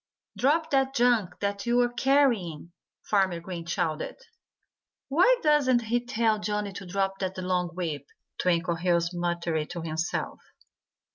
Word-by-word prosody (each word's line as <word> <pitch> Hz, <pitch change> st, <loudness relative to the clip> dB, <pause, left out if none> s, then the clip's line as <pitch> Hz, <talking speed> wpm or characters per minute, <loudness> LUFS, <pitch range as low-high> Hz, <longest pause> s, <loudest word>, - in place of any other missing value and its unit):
"Drop 315 Hz, +5 st, +1 dB
that 270 Hz, -1 st, +2 dB
junk 235 Hz, -8 st, +2 dB
that 200 Hz, +2 st, -2 dB
you're 240 Hz, 0 st, +2 dB
carrying!" 240 Hz, -, +1 dB, 0.3 s
Farmer 190 Hz, -4 st, +1 dB
Green 170 Hz, -1 st, -7 dB
shouted. 170 Hz, -3 st, -2 dB, 0.9 s
"Why 360 Hz, -, +5 dB
doesn't 275 Hz, -6 st, +3 dB
he 240 Hz, +2 st, 0 dB
tell 225 Hz, -3 st, +1 dB
Johnnie 210 Hz, -1 st, -2 dB
to 195 Hz, -1 st, -8 dB
drop 195 Hz, +1 st, -1 dB
that 190 Hz, -1 st, -3 dB
long 180 Hz, -1 st, 0 dB
whip?" 155 Hz, -6 st, -4 dB, 0.3 s
Twinkleheels 170 Hz, 0 st, +1 dB
muttered 170 Hz, -3 st, -1 dB
to 175 Hz, -1 st, -5 dB
himself. 160 Hz, +1 st, -3 dB
195 Hz, 125 wpm, -27 LUFS, 175-240 Hz, 0.9 s, Why